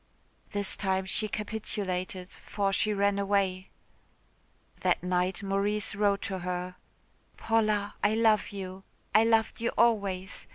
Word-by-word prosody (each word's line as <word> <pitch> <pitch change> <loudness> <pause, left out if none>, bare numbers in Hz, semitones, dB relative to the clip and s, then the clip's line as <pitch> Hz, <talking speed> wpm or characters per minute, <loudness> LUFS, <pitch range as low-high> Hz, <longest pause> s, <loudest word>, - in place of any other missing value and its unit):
This 205 -2 +1
time 190 -1 0
she 215 +3 0
capitulated 195 -4 -3
for 200 -1 -2
she 215 - +3
ran 200 0 +1
away. 195 -2 0 1.1
That - - +1
night 180 +1 0
Maurice 200 +2 0
wrote 200 -1 +1
to 190 -1 -3
her. 180 0 -4 0.6
"Paula, 215 -2 +1
I 210 +1 +3
love 220 -2 +3
you. 190 -2 -7 0.3
I 215 - +6
loved 225 0 +2
you 235 - +1
always. 200 -5 +1
200 Hz, 125 wpm, -29 LUFS, 190-210 Hz, 1.1 s, I